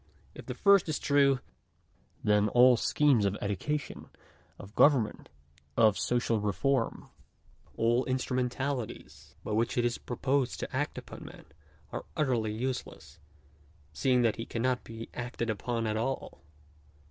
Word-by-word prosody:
If - - -11
the - - -4
first 200 -5 +4
is 155 - 0
true, 140 -2 +3 0.8
then 105 0 +3
all 125 +2 +6
schemes 135 -1 +3
of 100 +1 0
education, 125 +9 -3 0.5
of 100 +1 -12
government, 130 -7 +3 0.5
of 110 -3 +5
social 120 -2 0
reform 115 +5 -1 0.3
— - - -31
all 120 +3 +2
instrumentalities 130 0 -3
by - - -5
which 115 +3 0
it 120 - +2
is 120 0 -1
proposed 130 +1 -1
to - - -5
act 145 +2 -2
upon - - -9
man, - - -12 0.5
are - - -5
utterly 120 -7 +1
useless, 110 - -5 0.7
seeing 125 - +2
that 115 -2 +2
he 115 - -4
cannot 125 +2 -1
be 115 0 -8
acted 120 -1 -3
upon 115 +2 -2
at 110 0 -1
all. 120 - -3
120 Hz, 135 wpm, -30 LUFS, 110-130 Hz, 0.8 s, all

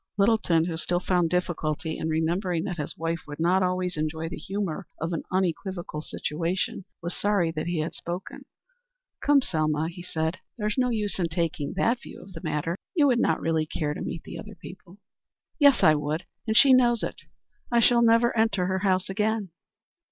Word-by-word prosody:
Littleton, 200 -6 +3
who 165 -2 -3
still 175 +1 0
found 180 -2 +1
difficulty 160 -3 -1
in 160 - -2
remembering 165 +2 0
that 180 -4 -4
his 150 -2 -4
wife 165 +1 -2
would 145 +1 -8
not 180 +3 +3
always 180 -1 0
enjoy 160 +1 -2
the - - -5
humor 190 0 -4
of 165 +2 -2
an 165 - -1 0.2
equivocal 175 -2 -4
situation, 170 +5 -3 0.2
was 170 +1 -3
sorry 200 -5 +1
that 155 0 -4
he 175 -3 0
had 155 - -3
spoken. 175 +2 -6 0.8
"Come, 285 -2 +5
Selma," 155 -3 0
he 175 +1 -9
said, 160 -1 -2 0.2
"there's 210 -1 -1
no 250 -1 +2
use 210 -4 -1
in 170 -2 +1
taking 160 -3 -2
that 240 +1 +1
view - - -10
of 190 - -13
the 165 - -8
matter. 165 +4 -1 0.2
You 305 -4 +5
would 250 -4 +4
not 160 - +2
really 160 -1 0
care 150 -1 -2
to - - -7
meet 165 - -4
the - - -8
other 210 0 -9
people." 180 +2 -12 0.6
"Yes, 285 -3 +6
I 155 - +7
would, 150 +3 -2 0.2
and 220 0 +2
she 270 +2 +8
knows 240 -3 +4
it. - - -4 0.5
I 240 - +4
shall 235 +1 +5
never 230 +1 +4
enter 220 -5 +2
her 190 +1 0
house 185 -1 +1
again." 210 0 -1
180 Hz, 190 wpm, -26 LUFS, 160-205 Hz, 0.8 s, she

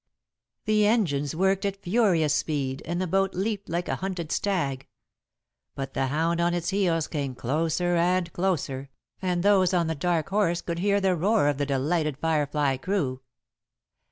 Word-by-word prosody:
The 215 -1 +3
engines 155 - +1
worked 190 +2 +1
at 200 0 -3
furious 180 -7 +2
speed, 140 -4 -1
and 175 +2 -2
the 185 - 0
boat 195 +2 0
leaped 200 +1 -2
like 170 +2 -2
a - - -1
hunted 185 -4 -4
stag. 140 -10 -1 0.9
But 135 -1 -5
the 135 0 0
hound 165 +5 0
on 175 0 +2
its 170 -1 -2
heels 175 -5 +1
came 140 -4 -4
closer 165 +7 0
and 175 0 +1
closer, 140 -7 -2 0.3
and 180 -2 0
those 195 -3 +4
on 170 -1 +2
The 160 - -1
Dark 165 +2 -1
Horse 190 -4 +1
could 170 -1 -4
hear 200 +2 +2
the 190 -2 +2
roar 200 0 +2
of 145 -1 -2
the 145 - 0
delighted 150 +2 0
Firefly 145 -3 0
crew. 135 -5 -2
170 Hz, 165 wpm, -26 LUFS, 145-190 Hz, 0.9 s, those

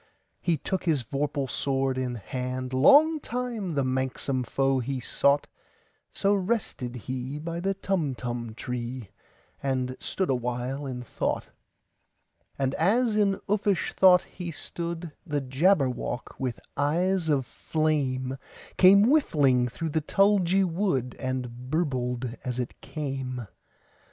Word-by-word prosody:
He 170 -2 +1
took 185 +6 -2
his 155 -7 +2
vorpal 140 +2 -2
sword 135 0 0
in 130 -1 -2
hand:Long 130 - +3
time 235 - -3
the 140 - +2
manxome 130 0 -1
foe 135 +2 +1
he 130 +2 -2
sought—So 145 +9 -1
rested 190 - -1
he 130 +3 -4
by 165 +2 -4
the 195 +2 0
Tumtum 125 - -2
tree, 125 -2 -5 0.5
And 130 -2 -1
stood 190 -6 -1
awhile 125 +3 -2
in 125 -2 -5
thought. - - -2 1.1
And 135 -1 0
as 220 +6 +3
in 200 -2 +2
uffish 200 -3 +1
thought 185 -1 +6
he 180 -2 -7
stood, 170 +1 -5
The 150 -5 -1
Jabberwock, 135 -2 0
with 125 -3 -2 0.2
eyes 170 +4 +1
of 140 -4 +2
flame, 135 -4 -1 0.4
Came 195 +2 +8
whiffling 145 - +3
through 160 +7 -4
the 155 +1 0
tulgey 195 +2 +3
wood, 165 - 0
And 125 -1 -4
burbled 125 -6 -1
as 125 -1 -3
it 125 -1 -4
came! 135 -5 -4
140 Hz, 120 wpm, -27 LUFS, 130-180 Hz, 1.1 s, Came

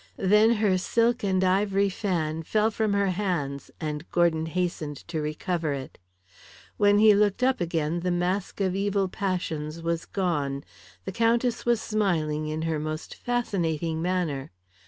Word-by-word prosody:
Then 210 +4 +5
her 205 -4 +2
silk 235 +5 +1
and 190 -2 +1
ivory 195 +1 +2
fan 170 -5 -2
fell 215 +6 +1
from 215 -1 0
her 200 -1 +2
hands, 170 -8 -2
and 150 -2 -3
Gordon 165 -2 +2
hastened 160 -4 -2
to 160 -2 -2
recover 155 +1 -2
it. 135 -1 -7 0.8
When 205 0 +4
he 215 0 +7
looked 205 +3 +2
up 260 -5 +2
again 165 -1 -1
the 180 +1 -1
mask 180 +3 -1
of 190 -1 +1
evil 200 0 +1
passions 165 -5 -3
was 165 0 -2
gone. 145 -8 -1 0.4
The 190 - -3
Countess 230 +3 +1
was 240 -2 +3
smiling 160 -9 0
in 155 +1 -3
her 160 -2 -1
most 155 +1 -5
fascinating 170 -9 -1
manner. 170 -6 -1
180 Hz, 150 wpm, -26 LUFS, 160-205 Hz, 0.8 s, he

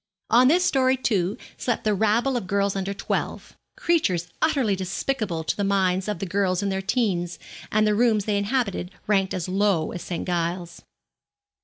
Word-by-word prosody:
On 245 +3 +6
this 355 +6 +4
story, 260 -2 +3
too, 205 -5 0 0.2
slept 240 - -1
the 215 - +2
rabble 220 +6 +2
of 235 -7 -2
girls 200 0 +1
under 195 0 -2
twelve 200 - -3 0.2
creatures 185 - +1
utterly 270 -10 +2
despicable 190 0 -2
in 160 - -1
the 205 - 0
minds 190 -1 +1
of 210 -3 -2
girls 190 0 0
in 200 - 0
their 190 0 -1
teens, 190 -5 0 0.3
and 215 0 +3
the 210 - +3
rooms 215 -2 +2
they 205 -2 +1
inhabited 200 -4 -1 0.2
ranked 195 -2 +1
as 180 -1 -3
low 190 -4 +1
as 180 - -6
St. 175 - -4
Giles's. 175 -1 -2
200 Hz, 170 wpm, -24 LUFS, 185-225 Hz, 0.3 s, On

